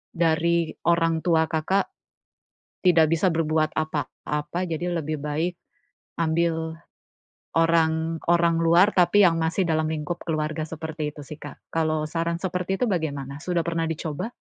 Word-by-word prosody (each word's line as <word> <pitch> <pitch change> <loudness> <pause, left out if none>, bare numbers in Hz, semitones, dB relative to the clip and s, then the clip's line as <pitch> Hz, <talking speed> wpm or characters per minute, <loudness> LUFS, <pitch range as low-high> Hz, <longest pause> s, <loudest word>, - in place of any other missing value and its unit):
dari 170 0 +2 0.2
orang 165 -1 +3
tua 160 -2 +3
Kakak 170 +5 +1 1.0
tidak 165 -3 +5
bisa 165 +3 +3
berbuat 155 -1 +1
apa-apa, 150 +2 -3
jadi 170 +2 -2
lebih 155 0 -3
baik 155 +4 -1 0.7
ambil 160 0 0 0.8
orang, 165 0 +2
orang 170 -1 +4
luar, 170 +4 +5
tapi 180 +3 +4
yang 165 -2 +4
masih 165 +4 +1
dalam 160 -2 +1
lingkup 155 +2 -3
keluarga 155 -1 -2
seperti 155 -1 -5
itu 145 - -9
sih 150 +2 -9
Kak. - - -9 0.2
Kalau 155 -1 0
saran 165 +2 -2
seperti 185 0 -1
itu - - +3
bagaimana? 145 -5 -3
Sudah 170 0 -1
pernah 165 0 -1
dicoba? 160 - -4
165 Hz, 135 wpm, -25 LUFS, 155-170 Hz, 1.0 s, tidak